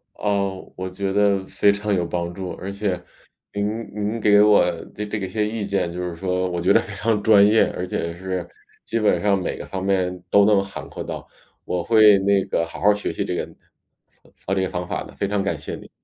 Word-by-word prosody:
噢， 100 -2 -2
我 95 0 -4
觉 95 +1 -3
得 100 -1 +2
非 100 - +3
常 100 +1 -1
有 90 -3 +1
帮 85 0 -3
助。 95 0 -5
而 95 - -6
且 100 -3 -2 0.5
您 100 0 -1 0.3
您 105 +2 -2
给 105 -1 +6
我 105 0 +6 0.3
的 105 - -4
这 105 +1 -3
个 95 - -3
些 105 +2 -1
意 110 -1 -3
见， 95 -3 -1
就 90 +1 -5
是 90 -1 -4
说 90 +1 -1
我 85 -1 -3
觉 90 - +3
得 - - +6
非 115 -3 -6
常 105 +1 0
专 105 -2 +6
业， 110 +2 +5
而 90 - -3
且 85 -2 -3
是 90 -1 -4 0.4
基 115 - -1
本 110 - +2
上 100 -1 +3
每 90 - -3
个 - - -7
方 95 -1 -5
面 95 -2 0
都 100 +1 +5
能 100 -2 +4
涵 95 0 -8
括 - - -6
到， - - -7 0.4
我 90 -1 -2
会 110 0 +6
那 100 0 +2
个 85 - 0
好 80 - -10
好 105 +3 +5
学 105 - -3
习 - - -3
这 - - -2
个 - - -2 1.0
这 95 - +1
个 95 - -1
方 90 0 -4
法 - - -3
的， - - -13
非 100 - -1
常 100 0 0
感 95 -5 -1
谢 75 - -6
你。 - - -12
100 Hz, 245 characters per minute, -22 LUFS, 90-105 Hz, 1.0 s, 给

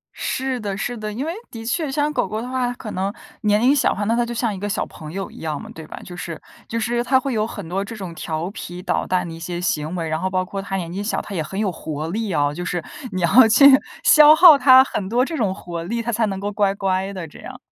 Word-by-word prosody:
是 260 -1 -2
的 200 -2 -4
是 245 +3 -3
的， 215 -1 -5
因 255 +8 -4
为 330 - -2 0.2
的 225 -1 -8
确 285 +3 -1
像 295 +1 0
狗 195 - 0
狗 215 +3 -4
的 245 - -5
话 255 -1 -1
可 220 -3 -8
能 195 +1 -2 0.3
年 210 -2 +3
龄 255 +5 +4
小 280 - +3
的 - - -1
话， 205 - -2
那 225 +3 +1
它 240 - +2
就 235 - -6
像 230 -2 -1
一 - - -8
个 205 +1 -3
小 - - -1
朋 155 -1 -10
友 195 +1 -5
一 - - -13
样 155 -2 -3
嘛， - - -10
对 160 -1 -10
吧。 - - -9
就 180 - -9
是 170 -2 -6 0.3
就 230 - -3
是 240 +1 0
它 260 +1 +3
会 270 0 -3
有 215 -1 +1
很 205 -6 -8
多 190 +4 -2
这 225 +3 -8
种 190 -5 -7
调 165 +1 -4
皮 180 -3 -8
捣 - - -1
蛋 180 -1 0
的 165 - -7
一 165 - -9
些 175 +1 -5
行 160 -2 -2
为， 165 -2 -3
然 155 +1 -2
后 185 - 0
包 185 0 -1
括 195 +1 -5
它 195 0 -4
年 170 -3 -4
纪 195 - -3
小， 205 - -1
它 205 - -9
也 170 - -1
很 190 +6 -5
有 205 -3 0
活 155 -1 -5
力 215 +2 -2
哦， 145 -1 +1
就 175 - -4
是 175 -1 -3 0.3
你 185 - -3
要 225 +9 +6
去 225 +6 +6 0.4
消 300 0 +8
耗 330 -1 +9
它 260 0 +7
很 200 -7 -4
多 245 +3 +2
这 330 - -5
种 210 -10 0
活 175 -3 -6
力， 230 +7 -2
它 235 +1 -2
才 230 0 +1
能 195 -1 -3
够 205 +1 -3
乖 200 -1 +1
乖 190 0 -1
的 185 -4 -6
这 - - -15
样。 - - -10
200 Hz, 310 characters per minute, -21 LUFS, 175-235 Hz, 0.4 s, 耗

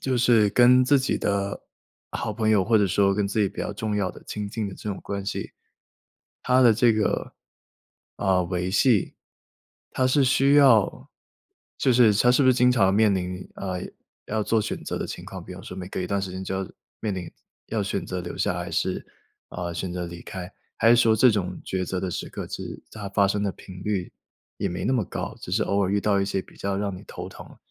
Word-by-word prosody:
就 130 -1 0
是 115 -3 +4
跟 125 +3 +6
自 140 +1 +4
己 130 - 0
的 100 0 -1 0.5
好 - - -3
朋 110 -2 0
友 105 -3 +4
或 110 +1 +4
者 100 - +3
说 100 +1 +3
跟 100 0 0
自 105 +2 -1
己 100 - +3
比 100 - -8
较 - - -3
重 105 +1 -3
要 95 -3 -1
的 - - -14
亲 105 -1 -5
近 105 0 -3
的 95 - -8
这 - - -7
种 100 - -3
关 100 -1 -5
系， 95 - -4 0.9
它 130 +1 +4
的 120 -2 +7
这 115 +1 +4
个， 110 -1 -1 0.8
呃 95 -2 +2
维 90 +1 -2
系， 110 +1 +3 0.8
它 130 - +1
是 135 +2 +3
需 135 +2 +4
要 130 -8 +4 0.7
就 130 - +3
是 115 -3 +5
它 120 +4 +4
是 135 - +4
不 130 - +4
是 130 - +6
经 125 0 +4
常 100 -6 +3
面 105 -1 +4
临， 90 0 -4
啊， 95 -2 -4 0.5
要 110 0 -1
做 110 +1 +2
选 - - -4
择 - - -3
的 - - -3
情 - - -7
况？ - - -8
比 - - -9
如 - - -10
说 90 - -9
每 90 -1 -6
隔 - - -4
一 90 - -2
段 100 +2 -1
时 95 - -4
间 95 +1 -6
就 95 - -3
要 95 - -7 0.3
面 105 -3 -2
临 90 -2 -6 0.4
要 110 -2 -1
选 100 -2 -2
择 90 0 -3
留 85 - -7
下 - - 0
还 - - -5
是， - - -1 0.4
啊， 85 -1 -5
选 90 +2 -4
择 90 0 -3
离 85 0 -9
开？ 90 -2 -7 0.2
还 115 - +4
是 120 - +7
说 115 -2 +4
这 125 +3 +6
种 95 -4 -2
抉 95 -1 -2
择 95 +1 -3
的 95 -1 -3
时 - - -4
刻 - - -6
是 - - -7
它 105 -2 -7
发 100 0 +3
生 100 +1 0
的 100 - 0
频 90 0 -12
率 100 -4 -2 0.5
也 - - -1
没 90 - -4
那 130 - +1
么 125 -4 +2
高， - - -5
只 - - -8
是 110 +4 +2
偶 100 0 +1
尔 95 - 0
遇 100 - +2
到 100 -1 +2
一 95 - +1
些 95 - -1
比 - - -19
较 100 0 -2
让 100 -1 -2
你 - - -11
头 - - -8
疼， - - -13
100 Hz, 255 characters per minute, -25 LUFS, 95-115 Hz, 0.9 s, 的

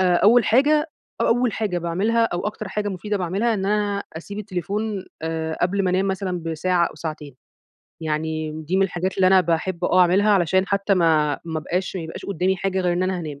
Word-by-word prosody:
آآ 180 -2 +4
أول 230 +5 +5
حاجة 295 +6 +3 0.3
أ - - +2
أول 245 -1 +2
حاجة 200 -5 -1
باعملها، 200 +8 +1
أو 180 -1 -2
أكتر 210 -1 -5
حاجة 205 +1 -2
مفيدة 205 +2 -3
باعملها 195 +6 0
إن 195 -2 -2
أنا 205 -1 0
أسيب 200 +5 -7
التليفون 200 +1 -3 0.2
آآ 160 0 -3
قبل 195 +2 +1
ما 180 - +2
أنام 190 +2 +1
مثلًا 185 -2 -2
بساعة 170 +2 +1
أو - - -9
ساعتين. 150 -4 -7 0.7
يعني 155 0 -2
دي 180 +4 0
من 195 - +4
الحاجات 185 0 -2
اللي 190 - +4
أنا 185 0 +6
باحب 170 +1 -1
آه، 185 - +4
أعملها 190 +4 +4
علشان 190 0 +3
حتى 200 0 +1
ما 155 -5 +2
ما 160 -1 -3
ابقاش 180 +4 -3
ما 170 - -4
يبقاش 160 - -8
قدامي 190 0 0
حاجة 190 +1 -1
غير 180 -1 +1
إن 175 +1 0
أنا 185 -1 -1
هانام. 150 -4 -6
185 Hz, 205 wpm, -22 LUFS, 170-200 Hz, 0.7 s, أنا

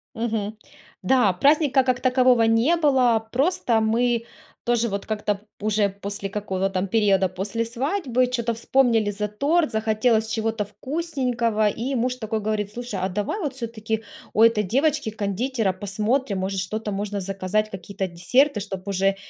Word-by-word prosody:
Мгм. 220 -2 -2 0.5
Да, 220 -4 +3
праздника 275 - +3
как 255 -1 0
такового 255 -2 +4
не 225 +9 +3
было, 255 -8 +2
просто 270 -4 +2
мы 230 +1 +1 0.4
тоже 240 -1 +2
вот 200 0 -4
как-то 210 -1 -1
п 200 - -17 0.2
уже 210 -1 +2
после 200 0 -5
какого-то 195 -2 -2
там 190 0 -2
периода, 195 -3 +3
после 195 +5 -2
свадьбы, 255 - 0
чё-то 235 -2 -1
вспомнили 230 -2 +2
за 210 +1 -2
торт, 290 +7 +1
захотелось 220 +1 +1
чего-то 225 -1 -1
вкусненького, 250 - -1
и 250 +6 -3
муж 250 +1 0
такой 220 -2 -3
говорит: 210 -1 -2
"Слушай, 240 -5 -5
а 185 - 0
давай 205 - -2
вот 295 -7 -3
всё-таки 225 -2 -4 0.3
у 215 - +2
этой 230 -2 +4
девочки-кондитера 225 - 0
посмотрим, 210 +4 -1
может, 190 0 -2
что-то 215 +3 -3
можно 205 0 -3
заказать, 195 +2 -1
какие-то 195 0 -5
десерты, 210 +9 +2
чтоб 195 -1 -6
уже 195 0 +1
220 Hz, 150 wpm, -23 LUFS, 200-250 Hz, 0.5 s, такового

